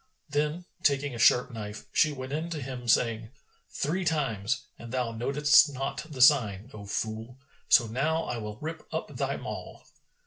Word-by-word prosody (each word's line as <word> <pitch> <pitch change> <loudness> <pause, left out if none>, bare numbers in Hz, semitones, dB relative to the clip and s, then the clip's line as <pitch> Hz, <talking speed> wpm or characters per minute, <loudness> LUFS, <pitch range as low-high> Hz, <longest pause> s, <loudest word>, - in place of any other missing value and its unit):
Then, 150 +4 -1 0.2
taking 140 -1 +1
a 120 - -6
sharp 125 +2 +5
knife, 105 -2 -7
she 155 - +4
went 130 -1 -6
in 160 +3 -2
to 165 -3 -4
him, 125 -2 -7
saying, 115 -1 +2 0.4
"Three 175 +7 -1
times, 135 - 0 0.2
and 115 0 -9
thou 125 -2 -1
notedst 145 +6 +4
not 135 +3 -4
the 130 -5 +2
sign, 120 -5 +4
O 100 -2 -9
fool![FN#417] 110 +4 -4 0.3
So 120 - +6
now 150 +9 0
I 120 - -3
will 105 -1 -6
rip 160 +5 -6
up - - -4
thy - - -1
maw." - - -7
130 Hz, 170 wpm, -28 LUFS, 115-150 Hz, 0.4 s, So